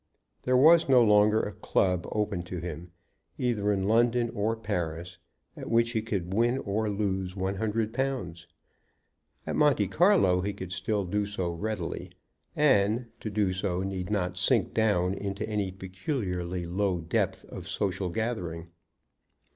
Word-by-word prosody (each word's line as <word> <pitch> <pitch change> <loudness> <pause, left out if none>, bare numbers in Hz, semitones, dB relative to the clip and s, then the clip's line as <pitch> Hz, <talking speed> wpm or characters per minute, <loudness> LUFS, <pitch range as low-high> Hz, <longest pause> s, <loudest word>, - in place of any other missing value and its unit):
There 125 0 +2
was 160 +3 +6
no 125 -2 +7
longer 105 0 +5
a 105 - -3
club 90 -3 0
open 105 -4 -1
to 90 0 -6
him, 85 0 -6 0.5
either 110 -5 0
in 95 -1 0
London 120 +1 +2
or 110 +2 -1
Paris, 90 -5 -4 0.4
at - - -7
which 115 0 +3
he 110 -2 0
could 95 -5 -3
win 120 +4 +2
or 110 -2 -1
lose 95 -2 -2
one 95 0 -2
hundred 110 +1 -1
pounds. 120 -11 -3 1.0
At - - -3
Monte 150 -2 +3
Carlo 170 - +4
he 100 +2 -2
could 95 -2 -8
still 95 +3 -1
do 105 +3 -1
so 95 -4 -2
readily; 95 0 -4 0.5
and, 120 -4 +2
to 110 - -4
do 105 -3 0
so, 95 -1 -2
need 95 -1 -4
not 90 -3 -1
sink 100 0 +2
down 100 -5 +2
into 100 +2 -4
any 105 -3 -1
peculiarly 90 - -4
low 95 +1 0
depth 80 0 -1
of - - -9
social 95 -2 -1
gathering. 90 -6 -3
100 Hz, 150 wpm, -28 LUFS, 90-110 Hz, 1.0 s, no